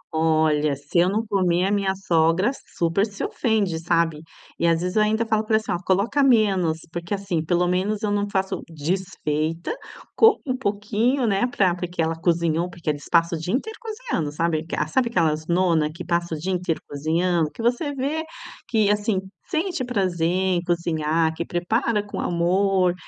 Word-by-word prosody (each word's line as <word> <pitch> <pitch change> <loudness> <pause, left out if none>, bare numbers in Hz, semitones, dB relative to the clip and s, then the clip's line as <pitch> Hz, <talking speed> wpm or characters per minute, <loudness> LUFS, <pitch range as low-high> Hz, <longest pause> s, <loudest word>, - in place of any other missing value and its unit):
Olha, 155 -2 +2
se 145 +5 -1
eu 180 +2 +4
não 220 +3 -1
comer 185 -3 +1
a 200 - 0
minha 195 -2 +1
sogra 175 +4 +2 0.3
super 170 +4 +2
se 205 -2 -4
ofende, 205 -9 0
sabe? 165 -2 +1 0.4
E 170 - +2
às 165 0 +2
vezes 180 +3 -2
eu 215 - +4
ainda 220 +2 +2
falo 220 -1 +1
pra 220 0 +1
ela, 220 - +3
assim, 175 - -6
coloca 200 +11 +1
menos, 195 -11 +3
porque, 175 +4 -3
assim, 190 -5 -2
pelo 175 +2 +1
menos 200 +4 0
eu 205 - 0
não 205 0 0
faço 190 -1 -1
desfeita, 165 - -2 0.4
como 445 -1 +6
um 255 -1 -1
pouquinho, 225 +3 0
né, 205 +2 +2
pra 190 -7 +2
por 180 0 -4
que 175 - -15
ela 165 0 +2
cozinhou, 170 0 0
porque 170 -3 -3
eles 145 -1 -7
passa 170 0 +3
o - - -5
dia 180 +8 -1
inteiro 445 +11 -4
cozinhando, 440 - -3
sabe? 160 0 0 0.2
Sabe 245 +7 +1
aquelas 155 -6 0
nona 170 -3 +2
que 165 - -8
passa 170 -1 -1
o - - -5
dia 185 +5 -3
inteiro 180 -3 -1
cozinhando? 160 +2 0
Que 230 - -8
você 245 +5 +1
vê 290 +5 -1 0.4
que 215 -3 +2
assim 210 -1 +1 0.3
sente 345 -4 -1
prazer 185 -9 0
em 185 -1 +1
cozinhar, 160 -2 0
que 170 - -3
prepara 210 +5 0
com 205 - -6
amor 180 +1 +2
180 Hz, 180 wpm, -23 LUFS, 165-210 Hz, 0.4 s, como